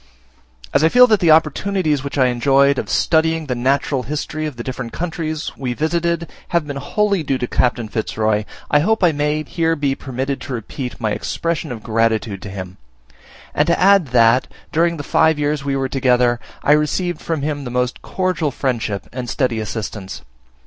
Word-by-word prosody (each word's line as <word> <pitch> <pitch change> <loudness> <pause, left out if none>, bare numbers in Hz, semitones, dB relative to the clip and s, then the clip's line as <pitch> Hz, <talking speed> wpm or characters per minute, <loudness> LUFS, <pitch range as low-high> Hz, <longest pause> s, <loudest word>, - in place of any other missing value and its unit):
As 145 - +3
I 160 - +5
feel 250 +7 +7
that 215 -4 +3
the 170 - +2
opportunities 155 -1 +2
which 140 0 -5
I 130 -2 +4
enjoyed 135 +3 +3
of - - -5
studying 160 0 +2
the 130 - -2
Natural 135 +2 0
History 150 +3 -3
of 150 - -7
the 120 - -6
different 125 -2 -5
countries 160 -3 -3
we 125 -3 -3
visited, 170 +2 0 0.2
have 170 -3 0
been 145 -1 -5
wholly 200 +6 0
due 135 -3 -1
to 125 - -2
Captain 120 -2 0
Fitz 110 0 -4
Roy, 110 -1 +1 0.3
I 145 - +5
hope 215 +6 +1
I 175 - +6
may 150 +1 -1
here 165 +2 0
be 140 -3 0
permitted 135 0 -4
to 135 - -6
repeat 125 +3 -6
my 110 -3 -1
expression 165 +4 -2
of 115 -3 -7
gratitude 110 -3 0
to 100 - -7
him; 95 -1 -7 0.8
and - - +2
to - - +2
add 195 -3 +5
that, 120 0 +4 0.2
during 170 +1 +2
the 145 - -5
five 160 +2 +3
years 145 -1 -1
we 140 -1 -1
were 135 -1 0
together, 125 -2 +2 0.2
I - - +3
received 155 +3 +1
from 160 -4 -2
him 145 -1 -2
the 125 - -5
most 125 0 -1
cordial 185 -5 -1
friendship 120 -7 -2
and 125 -1 -5
steady 125 -4 0
assistance. 105 -3 -5
140 Hz, 190 wpm, -19 LUFS, 125-160 Hz, 0.8 s, feel